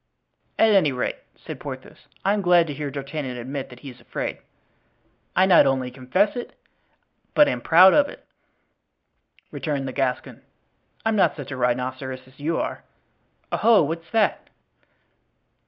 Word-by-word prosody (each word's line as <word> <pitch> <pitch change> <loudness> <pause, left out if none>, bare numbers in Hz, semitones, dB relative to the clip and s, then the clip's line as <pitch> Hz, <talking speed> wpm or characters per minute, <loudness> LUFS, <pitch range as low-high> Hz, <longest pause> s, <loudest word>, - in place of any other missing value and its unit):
"At 225 - +5
any 185 -8 +4
rate," 125 -1 -2 0.2
said - - -9
Porthos, - - -9 0.2
"I 200 - +3
am 210 - 0
glad 175 -2 +4
to 150 - -5
hear 145 0 -4
D'Artagnan 140 -2 -5
admit 130 +3 -5
that 125 0 -14
he 140 - -8
is 125 - -18
afraid." - - -5 1.0
"I 185 - +5
not 175 -7 +6
only 130 -2 0
confess 130 - 0
it, 245 - -7 0.8
but 295 - +6
am - - -2
proud 185 +3 +7
of 285 -1 +4
it," - - -13 1.3
returned 140 -4 -3
the 130 - -5
Gascon; 130 -2 -2 0.6
"I'm 225 0 +2
not 200 - +3
such 145 -2 -8
a - - -4
rhinoceros 130 +1 -2
as 130 +2 -21
you 160 +3 -1
are. - - -4 0.7
Oho! 225 -6 +4
what's 165 +2 -4
that?" 225 -2 0
145 Hz, 155 wpm, -23 LUFS, 130-185 Hz, 1.3 s, proud